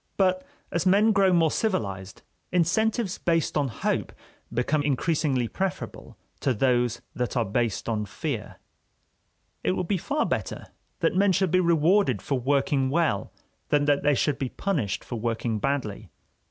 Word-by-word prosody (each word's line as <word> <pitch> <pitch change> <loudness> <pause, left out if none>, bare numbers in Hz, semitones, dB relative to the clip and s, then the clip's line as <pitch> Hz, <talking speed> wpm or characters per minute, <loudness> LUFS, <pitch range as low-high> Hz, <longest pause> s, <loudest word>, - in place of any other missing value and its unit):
But 185 -1 +2 0.3
as 170 +2 0
men 205 +4 +5
grow 195 -3 +4
more 165 -3 +3
civilized, 100 - -2 0.3
incentives 195 +4 +1
based 165 -2 0
on 145 -2 +2
hope 115 - -2 0.4
become 125 +6 +1
increasingly 145 -3 0
preferable 190 - -4 0.2
to 130 -3 0
those 120 0 +1
that 125 +1 -2
are 120 - +2
based 115 +1 -1
on 105 -2 -1
fear. - - -4 1.1
It 90 - +2
would 180 - -2
be 195 -1 0
far 295 - 0
better - - -3 0.3
that - - +2
men 200 +1 +4
should 185 -1 +1
be 185 - +4
rewarded 170 - +3
for 135 +5 -2
working 135 +1 +1
well 150 -9 0 0.4
than 145 -1 +3
that 145 -1 +3
they 145 0 +3
should 140 +2 0
be 130 - -2
punished 125 - -2
for 120 - -5
working 115 -1 -1
badly. 130 -6 -2
145 Hz, 155 wpm, -26 LUFS, 120-180 Hz, 1.1 s, men